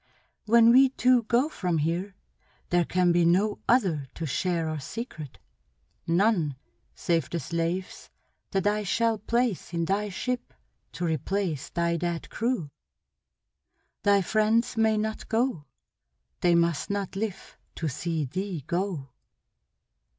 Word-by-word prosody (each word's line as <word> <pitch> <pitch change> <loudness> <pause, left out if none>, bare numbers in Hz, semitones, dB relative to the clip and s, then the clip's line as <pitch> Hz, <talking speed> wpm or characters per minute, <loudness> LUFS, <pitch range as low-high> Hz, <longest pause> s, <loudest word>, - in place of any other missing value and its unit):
When 230 +1 +6
we 265 +2 +7
two 255 -1 +3
go 235 +5 +2
from 180 - -2
here, 170 +6 -1 0.6
there 175 -1 +3
can 180 -1 +2
be 170 0 +3
no 190 +5 +2
other 185 - +2
to 165 - -4
share 165 +3 -1
our 155 -1 -3
secret; 155 - -7 0.7
none 170 - +2 0.4
save 165 -6 0
the 170 - -2
slaves 170 +3 -3 0.4
that 195 -1 -1
I 210 +1 +2
shall 225 +2 +1
place 230 -5 -1
in 170 0 0
thy 205 +4 0
ship 250 +6 -4 0.4
to 175 - -3
replace 165 0 -2
thy 170 0 0
dead 170 0 -3
crew. 225 - -1 1.3
Thy 200 -1 +4
friends 220 +4 +2
may 220 -1 +3
not 220 +1 -3
go. 230 - 0 0.7
They 175 -1 +3
must 170 -3 +1
not 200 -2 -3
live 205 -1 -4 0.2
to 160 - -3
see 155 +2 -2
thee 185 +2 -4
go!" 170 -7 -2
185 Hz, 130 wpm, -27 LUFS, 170-220 Hz, 1.3 s, we